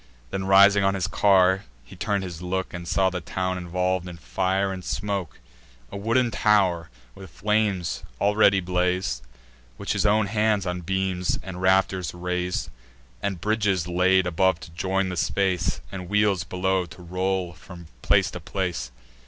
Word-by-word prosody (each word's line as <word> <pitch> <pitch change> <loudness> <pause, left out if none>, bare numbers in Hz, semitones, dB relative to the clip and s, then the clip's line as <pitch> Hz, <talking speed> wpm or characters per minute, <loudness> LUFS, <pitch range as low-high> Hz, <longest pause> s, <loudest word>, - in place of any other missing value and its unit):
Then, 95 -1 -3
rising 100 +1 +6
on 95 0 +2
his 95 -3 -1
car, 95 -1 +3 0.2
he - - -13
turn'd 100 -1 -1
his 85 -3 -7
look, 95 +1 -3
And 85 -1 -6
saw 95 +1 +2
the 90 -1 -4
town 95 0 -2
involv'd 90 +1 -1
in 85 -1 -8
fire 95 +4 -1
and 95 -1 -7
smoke. 95 -5 -3 0.5
A - - -7
wooden 115 +4 +1
tow'r 95 -6 +2 0.2
with 95 -2 -11
flames 105 -1 0 0.2
already 100 -1 +4
blaz'd, 90 -6 -1 0.6
Which - - -2
his - - 0
own 105 +1 +3
hands 105 -1 +1
on 90 0 -3
beams 95 0 -1
and 95 -1 -7
rafters 95 -2 +2
rais'd; 90 0 -2 0.5
And 95 -3 -2
bridges 105 -5 +1
laid 90 +1 +3
above 90 0 +2
to - - -10
join 95 +3 -1
the 90 - -4
space, 90 -2 0
And 90 -2 -7
wheels 105 -3 +2
below 95 -1 0
to 90 +2 -13
roll 90 0 -2
from 90 +1 -12 0.2
place - - +3
to - - -6
place. 90 -7 -3
95 Hz, 160 wpm, -25 LUFS, 90-100 Hz, 0.6 s, rising